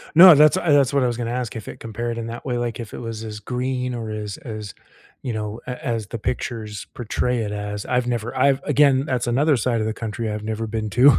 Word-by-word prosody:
No, 180 0 +11
that's, 150 +4 +6
uh, 175 -4 +1
that's 140 -1 +4
what 140 -2 +3
I - - +3
was 120 -1 -2
gonna 120 -1 -2
ask, 125 -2 -3
if 110 - -7
it - - -8
compared 115 +1 -4
in 115 -1 -4
that 115 +1 -7
way, 125 -3 -1
like, 120 -1 -2
if 115 -3 -7
it - - -6
was 115 -2 -5
as 105 -1 -6
green 125 +2 -2
or 115 -2 -4
as 105 -2 -4
as, 110 -4 -7 0.5
you 125 - -3
know, 105 +1 -4
a 125 -1 -6
as 115 -4 -1
the 115 - -5
pictures 110 -2 -4
portray 125 +1 -1
it 105 -2 -2
as. 105 0 -4
I've 125 -1 0
never, 120 -1 -2
I've 140 -1 +4
again, 140 -2 +4
that's 125 -4 -1
another 140 +5 +3
side 120 -1 0
of 110 - 0
the 110 - -1
country 115 0 -4
I've 105 0 -4
never 110 +1 -3
been 110 0 -3
to. 125 0 +6
120 Hz, 250 wpm, -22 LUFS, 110-125 Hz, 0.5 s, No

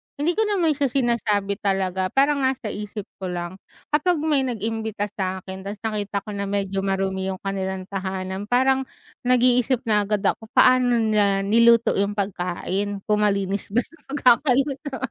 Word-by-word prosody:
Hindi 295 +4 0
ko 435 +4 0
naman 360 -6 +2
siya 285 -1 +1
sinasabi 225 -6 0
talaga. 190 -2 0
Parang 280 +6 +2
nasa 260 -5 -1
isip 210 0 -6 0.2
ko 190 - -4
lang. 175 +1 -5 0.3
Kapag 310 +4 +2
may 290 -4 +1
nag-imbita 220 -2 -3
sa'kin 190 -1 -4
ta's 205 - -4
nakita 205 -2 -2
ko 210 - -7
na 200 0 -3
medyo 195 -1 -1
marumi 190 -1 -1
yung 190 -1 -4
kanilang 190 -1 -3
tahanan, 190 0 -4
parang 265 +2 +2 0.4
nag-iisip 250 0 +3
na 210 -4 +1
agad 210 -1 -1
ako, 220 - 0
paano 255 -1 +5
nila 210 -3 +2
niluto 230 +3 +5
yung 200 +1 0
pagkain. 195 +1 -3
Kung 210 0 +2
malinis 200 -1 -1
ba 245 - +3
yung 330 -3 -22
pagkakaluto? 275 +1 +2
210 Hz, 155 wpm, -23 LUFS, 195-255 Hz, 0.4 s, paano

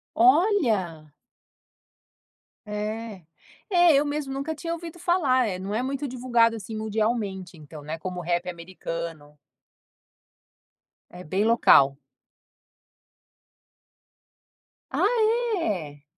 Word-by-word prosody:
Olha. 230 - +2 1.5
É. 210 -1 -5 0.5
É, 350 -4 +5
eu 285 +2 +3
mesmo 290 -2 -3
nunca 280 +4 -3
tinha 330 +3 -5
ouvido 335 0 -8
falar. 290 -9 +2
Eh, 185 -3 -3
não 195 +2 -5
é 235 - 0
muito 275 +2 -3
divulgado, 240 -2 +2
assim, 220 +1 -7
mundialmente, 210 -5 -2
então, 150 0 -11
né, 155 +2 -5
como 180 +2 -5
o 175 - -6
rap 175 +1 -1
americano. 165 -3 -7 1.7
É 180 +1 -11
bem 190 +7 -1
local. 140 -12 +5 2.9
Ah, - - +1 0.6
é? 155 - -3
215 Hz, 100 wpm, -25 LUFS, 175-270 Hz, 2.9 s, É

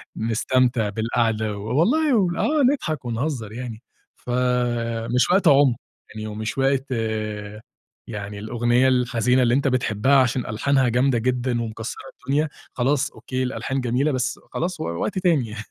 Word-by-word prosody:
نستمتع 115 0 +1
بالقعدة 110 -1 -1
و - - -7 0.2
والله 295 - +3 0.3
آه 300 -1 +2
نضحك 155 - -4
ونهزّر 120 -2 -3
يعني. 115 -1 -7 0.3
فمش 120 -1 0
وقت 190 -1 +3
عُم 140 -4 +5 0.3
يعني 110 0 -7
ومش 110 +3 -4
وقت 135 0 +1 1.2
يعني 105 -2 -6
الأغنية 120 +3 +2
الحزينة 125 0 +2
اللي 120 -1 +3
أنت 140 +1 +2
بتحبّها 130 +1 +2
عشان 130 -2 +3
ألحانها 130 +3 +1
جامدة 125 +1 +2
جدًا 125 0 0
ومكسّرة 115 0 -5 0.3
الدنيا، 150 +3 +1 0.2
خلاص 135 +3 +1
أوكي 130 0 -4
الألحان 135 +1 -2
جميلة، 125 +5 +1
بس 130 -1 -2
خلاص 180 +2 -2
و - - -3
وقت 85 - -2
تاني 165 -10 +2
يعني. 110 0 -7
125 Hz, 140 wpm, -23 LUFS, 115-135 Hz, 1.2 s, عُم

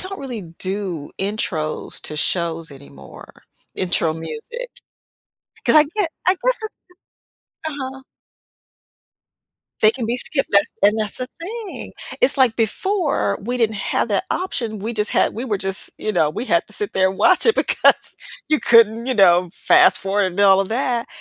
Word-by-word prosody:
don't 385 +1 -7
really 245 -7 -6
do 180 -1 -2
intros 190 -6 -3
to 155 - -4
shows 165 -1 -1
anymore. 100 - -14 0.3
Intro 175 -3 0
music. 165 - -7 0.9
'Cause - - +3
I 300 - +8
get 405 -6 0 0.2
I 365 - +6
guess - - -1
it's 435 - -6 0.9
uh-huh. 265 -3 -5 1.8
They 215 - +7
can 235 -2 -5
be 240 +2 -1
skipped. 270 +2 0
That's 200 0 +5 0.2
and 210 +2 +4
that's 215 -2 -1
the 255 0 -5
thing. 425 +2 -7 0.3
It's - - +5
like 255 -4 +3
before, 285 - 0
we 245 +4 -3
didn't 220 -2 +1
have 195 - -1
that - - 0
option, 235 - -3
we 220 +4 -4
just 210 -1 0
had - - +1
we 235 - -5
were 210 -6 -2
just, 195 0 -1
you 215 - -3
know, 150 -5 +2
we 225 - -5
had 170 - +1
to 215 - -6
sit 210 0 -1
there 190 0 +2
and 190 - -9
watch 370 - +4
it, 450 - +5
because - - +2 0.3
you 305 -1 +2
couldn't, 230 0 +4
you 260 - 0
know, 180 -3 +4
fast 365 +1 +4
forward 195 +1 0
and 200 - -3
all 195 -1 +6
of 195 - -2
that. 240 -1 -1
215 Hz, 170 wpm, -20 LUFS, 190-270 Hz, 1.8 s, I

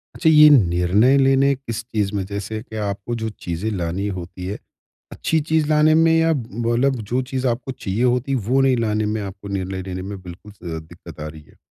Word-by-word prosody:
अच्छा 160 - +2
ये 150 -1 +8
निर्णय 100 +2 +4
लेने 135 +1 +4
किस 120 -3 -6
चीज़ 110 -4 -2
में 100 - -1
जैसे 100 +2 -5
कि 110 - -11
आपको 100 +3 -3
जो 110 - -1 0.2
चीज़ें 85 +5 -2
लानी 90 +1 -2
होती 90 -1 -6
है, 100 +3 -4 0.5
अच्छी 160 - 0
चीज़ 160 -2 +2
लाने 155 0 +4
में 165 0 +4
या 165 0 +3
मतलब 120 +1 0 0.2
जो 130 - +2
चीज़ 130 0 -1
आपको 120 +2 -2
चाहिए 110 -2 -3
होती 125 +2 +1
है 135 - +2
वो 135 +3 +3
नहीं 130 -2 +3
लाने 110 -2 0
में 105 +1 -2
आपको 100 0 -8
निर्णय 95 -1 -3
लेने 90 0 -4
में 100 +1 -6
बिल्कुल 90 +3 -11 0.2
अ, 80 - -4
दिक्कत 80 0 -13
आ 75 - -5
रही 75 0 -10
है। - - -23
110 Hz, 210 wpm, -21 LUFS, 95-135 Hz, 0.5 s, ये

